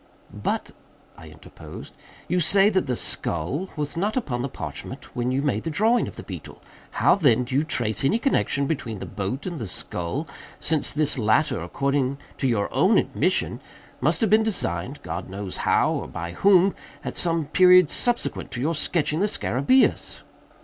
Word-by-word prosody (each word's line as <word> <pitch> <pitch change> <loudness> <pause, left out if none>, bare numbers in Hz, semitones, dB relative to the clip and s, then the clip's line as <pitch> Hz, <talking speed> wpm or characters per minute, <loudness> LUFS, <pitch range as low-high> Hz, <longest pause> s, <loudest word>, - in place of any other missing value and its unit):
"But," - - -3 0.4
I - - -13
interposed, - - -12 0.3
"you 180 - +1
say 195 +4 +5
that 190 -6 0
the 125 - 0
skull 120 - -2
was 150 0 -3
not 205 +8 -1
upon 125 - -2
the 135 - -3
parchment 75 -10 -8
when 125 +1 -1
you 135 +2 0
made 125 -8 0
the 165 - -4
drawing 220 +9 +2
of - - -9
the - - -8
beetle. - - -9 0.4
How - - +5
then 130 - +3
do 125 +1 -7
you 140 +3 +3
trace 120 -8 0
any 165 +11 +3
connexion 230 - +1
between 120 -8 -3
the - - -6
boat 105 +7 -4
and 175 -4 -4
the 115 - -4
skull—since 140 - -2
this 150 -2 0
latter, 110 +8 +2
according 140 -1 -1 0.2
to 135 - +1
your 110 -5 +1
own - - +4
admission, - - 0 0.4
must 155 +6 +2
have 220 - +2
been 215 +1 +6
designed 180 - -2
(God - - -5
only 95 - -9
knows 100 -2 -5
how - - +2
or - - -3
by 85 +1 -6
whom) 190 - +4 0.3
at - - -4
some 165 -2 +1
period 180 +1 +6
subsequent 240 -1 0
to 125 - -4
your 155 +6 0
sketching 155 0 0
the 205 - +2
_scarabæus? 200 - +1
145 Hz, 175 wpm, -24 LUFS, 120-180 Hz, 0.4 s, been